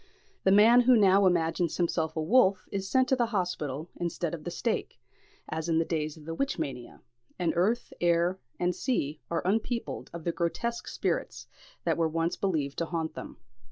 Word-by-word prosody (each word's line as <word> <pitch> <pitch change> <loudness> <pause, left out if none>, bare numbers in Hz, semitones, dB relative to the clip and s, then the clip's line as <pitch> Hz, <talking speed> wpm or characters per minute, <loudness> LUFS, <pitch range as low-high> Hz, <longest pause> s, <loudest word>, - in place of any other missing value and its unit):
The 190 - +5
man 225 +5 +7
who 250 +1 +5
now 195 -1 +5
imagines 170 -1 +1
himself 165 -2 0
a 160 - -1
wolf 195 0 +3
is 195 -1 -3
sent 260 -1 +3
to 265 - +4
the 240 -2 +1
hospital 175 - -3
instead 170 -1 -2
of 170 - -4
to - - -16
the - - -2
stake, 215 +6 -2 0.5
as 160 +1 -3
in 165 - +2
the 165 - +2
days 155 -2 -2
of 150 - -14
the 165 - -4
witch 275 +11 -1
mania; 135 -7 -5 0.4
and 175 -3 0
earth, 210 +8 +1
air, 175 +2 +2 0.2
and 180 0 +1
sea 155 - -2
are 170 0 -2
unpeopled 225 +4 -1
of 170 -1 -8
the 170 - 0
grotesque 235 +9 -2
spirits - - -2 0.4
that - - +1
were 165 -1 +2
once 165 +1 -1
believed 155 -8 -1
to 165 - -1
haunt 160 -2 -3
them. - - -8
175 Hz, 190 wpm, -29 LUFS, 160-200 Hz, 0.5 s, man